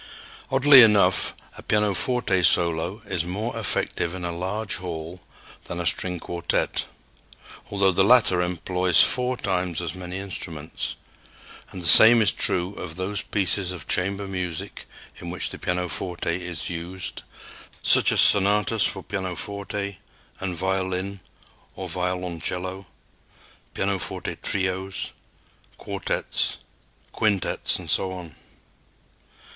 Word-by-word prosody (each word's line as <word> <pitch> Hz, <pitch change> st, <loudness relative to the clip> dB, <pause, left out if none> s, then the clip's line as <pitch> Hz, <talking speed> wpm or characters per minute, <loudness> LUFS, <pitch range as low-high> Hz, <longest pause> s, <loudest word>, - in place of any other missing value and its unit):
Oddly 135 Hz, 0 st, +8 dB
enough, 105 Hz, -3 st, +5 dB, 0.2 s
a -, -, -8 dB
pianoforte 105 Hz, -1 st, +1 dB
solo 85 Hz, +4 st, +2 dB
is 95 Hz, -4 st, -1 dB
more 105 Hz, +7 st, -4 dB
effective 95 Hz, -5 st, -1 dB
in 90 Hz, -1 st, -6 dB
a 85 Hz, -1 st, -4 dB
large 100 Hz, +4 st, -3 dB
hall 85 Hz, 0 st, -7 dB, 0.4 s
than 85 Hz, -, -6 dB
a 85 Hz, -, -3 dB
string 90 Hz, +1 st, +1 dB
quartet, 85 Hz, +1 st, -2 dB, 0.8 s
although 100 Hz, -1 st, +2 dB
the 95 Hz, +1 st, +2 dB
latter 105 Hz, -5 st, +5 dB
employs 90 Hz, 0 st, +2 dB
four 125 Hz, 0 st, +2 dB
times 90 Hz, -5 st, -2 dB
as 85 Hz, -3 st, -4 dB
many 90 Hz, 0 st, -7 dB
instruments; 85 Hz, -5 st, -5 dB, 0.7 s
and 90 Hz, -, -9 dB
the -, -, -2 dB
same 110 Hz, +8 st, +8 dB
is 105 Hz, -5 st, +4 dB
true 90 Hz, +2 st, 0 dB
of 80 Hz, -3 st, -7 dB
those 95 Hz, +2 st, -3 dB
pieces 95 Hz, -2 st, +2 dB
of 90 Hz, -4 st, -9 dB
chamber 100 Hz, +2 st, 0 dB
music 90 Hz, -4 st, -5 dB, 0.3 s
in 85 Hz, -, -7 dB
which 90 Hz, -, -3 dB
the -, -, -9 dB
pianoforte 90 Hz, -1 st, -2 dB
is 90 Hz, -3 st, -5 dB
used, 85 Hz, +2 st, -6 dB, 0.6 s
such -, -, +5 dB
as -, -, +2 dB
sonatas 105 Hz, +2 st, +4 dB
for 95 Hz, -, 0 dB
pianoforte 100 Hz, 0 st, -4 dB, 0.4 s
and 95 Hz, -2 st, -3 dB
violin 95 Hz, +1 st, -2 dB, 0.6 s
or -, -, -6 dB
violoncello, 90 Hz, +1 st, -3 dB, 0.9 s
pianoforte 95 Hz, -2 st, -3 dB
trios, 95 Hz, 0 st, -1 dB, 0.7 s
quartets, -, -, -2 dB, 0.6 s
quintets, 105 Hz, -4 st, 0 dB
and -, -, -6 dB
so 95 Hz, -, 0 dB
on. 90 Hz, -4 st, -9 dB
95 Hz, 120 wpm, -24 LUFS, 90-100 Hz, 0.9 s, Oddly